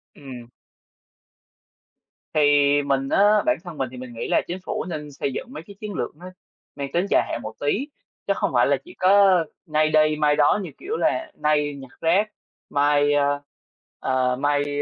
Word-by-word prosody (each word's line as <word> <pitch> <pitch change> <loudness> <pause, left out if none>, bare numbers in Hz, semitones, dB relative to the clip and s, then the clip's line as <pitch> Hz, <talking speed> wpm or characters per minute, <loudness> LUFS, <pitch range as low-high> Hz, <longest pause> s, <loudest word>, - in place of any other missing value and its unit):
Ừm. 125 -4 -10 1.9
Thì 155 - +2 0.4
mình 135 -1 0
á, 210 +1 +4
bản 310 - +2
thân 175 -4 -9
mình 130 -2 -2
thì 130 - -10
mình 125 -1 -9
nghĩ 115 - -5
là - - +2
chính 180 - -4
phủ - - -3
nên 150 -3 -6
xây 135 -1 -3
dựng - - -5
mấy 160 - -8
cái 200 - -12
chiến 210 -2 -6
lược - - -4
nó 180 +3 -10 0.5
mang 140 -1 -5
tính 175 +3 +1
dài - - +4
hạn 120 - -3
một 110 - -6
tí, 205 - -1 0.4
chứ - - +3
không - - -1
phải - - +4
là - - +2
chỉ 355 - -14
có 190 -2 +4 0.2
nay 155 -1 +1
đây 155 0 +3
mai 150 -1 +2
đó 150 +7 +3
như 175 - -6
kiểu 435 +5 -4
là 325 -1 0
nay 150 -1 0
nhặt 135 -2 -11
rác, 195 +6 +2 0.4
mai, 145 0 +2
a, 145 0 +2 0.6
ờ, 130 -1 +1
mai, 145 +1 0
150 Hz, 190 wpm, -23 LUFS, 140-185 Hz, 1.9 s, á